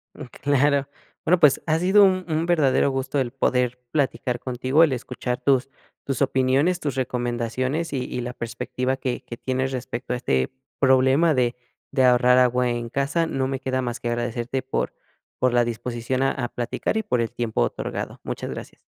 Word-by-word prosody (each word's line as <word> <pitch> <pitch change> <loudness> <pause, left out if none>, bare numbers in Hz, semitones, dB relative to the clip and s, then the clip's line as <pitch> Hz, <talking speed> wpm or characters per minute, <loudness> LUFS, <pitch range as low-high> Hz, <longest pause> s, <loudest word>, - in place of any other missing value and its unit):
Mm, - - -8 0.2
claro, 140 0 +2 0.4
bueno, 180 +2 +4
pues 150 -4 +5
ha 160 0 +2
sido 190 +4 +5
un 185 -1 +3
un 160 0 0
verdadero 155 -6 +3
gusto 135 +1 -1
el 125 -3 -1
poder 125 -1 0
platicar 130 -4 0
contigo, 130 +5 +2
el 160 - +3
escuchar 125 0 -4
tus 135 -1 +2 0.3
tus 135 -2 -3
opiniones, 135 +6 +2
tus 145 -6 -3
recomendaciones 130 +4 -2
y 130 -2 -1
y 125 - -4
la 120 +1 -5
perspectiva 125 +2 -3
que 125 -2 -3
que 120 - -8
tienes 130 +1 -1
respecto 125 -1 -4
a - - -1
este 65 - 0 0.3
problema 135 +4 +4
de 125 -3 +1 0.4
de 130 -2 +3
ahorrar 125 0 +5
agua 125 0 +3
en 120 -1 -3
casa, 140 +6 0
no 135 -4 -1
me 135 -1 -2
queda 130 0 -1
más 120 -2 -3
que 120 - -3
agradecerte 120 +2 -2
por 130 +1 -2 0.5
por 130 -1 +2
la 120 0 +4
disposición 120 +2 -2
a 135 - +3
a 120 -3 -3
platicar 120 - -2
y 220 - 0
por 125 - 0
el 115 - -2
tiempo 120 - -2
otorgado, - - -3
muchas - - -5
gracias. - - -8
130 Hz, 185 wpm, -24 LUFS, 120-140 Hz, 0.5 s, pues